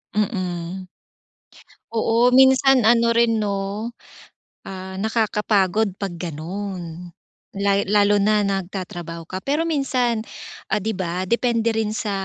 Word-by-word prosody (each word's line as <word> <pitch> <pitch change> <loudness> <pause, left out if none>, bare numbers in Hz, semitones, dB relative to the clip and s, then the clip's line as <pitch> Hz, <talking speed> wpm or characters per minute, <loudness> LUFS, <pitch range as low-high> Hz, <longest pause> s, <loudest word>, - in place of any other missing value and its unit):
Mhm. 185 -3 -2 1.1
Oo, 230 +2 +2
minsan 265 -2 +5
ano 235 0 +4
rin, 230 -1 +3
'no, 205 +2 -2 0.8
ah, 190 0 -7
nakakapagod 210 -2 +1
'pag 200 -2 -4
gano'n. 175 +1 -6 0.5
La 200 0 +2
lalo 205 0 +4
na 210 +1 +3
nagtatrabaho 180 -4 -4
ka. 185 +3 -6
Pero 290 +9 0
minsan,'di 240 - -2
ba, 185 -2 -3
depende 230 +2 +1
rin 220 -1 -1
sa, 220 -4 -2
205 Hz, 105 wpm, -22 LUFS, 185-230 Hz, 1.1 s, minsan